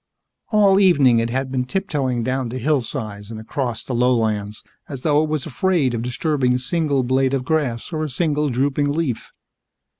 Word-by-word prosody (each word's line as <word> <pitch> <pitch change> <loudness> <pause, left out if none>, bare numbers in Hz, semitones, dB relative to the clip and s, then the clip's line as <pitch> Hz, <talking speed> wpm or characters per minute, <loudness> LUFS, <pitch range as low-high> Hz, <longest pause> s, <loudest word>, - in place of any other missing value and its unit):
All 200 -3 +4
evening 140 -11 +5
it 115 0 -1
had 130 +2 -2
been 130 -1 0
tiptoeing 135 -7 -2
down 130 0 -1
the 125 - -5
hillsides 115 -7 -2
and 110 -1 -7
across 120 +1 -3
the 130 - -5
lowlands 110 -4 0 0.3
as 135 -3 -6
though 150 0 +3
it 155 - -1
was 155 -3 -2
afraid 160 -3 +1
of 115 - -2
disturbing 125 +1 0
a - - +2
single 140 +1 0
blade 130 +2 +1
of 130 -2 -3
grass 140 -3 -1
or 155 0 -1
a 155 - -3
single 150 +1 0
drooping 140 +3 0
leaf. 145 -8 -2
130 Hz, 180 wpm, -21 LUFS, 120-150 Hz, 0.3 s, evening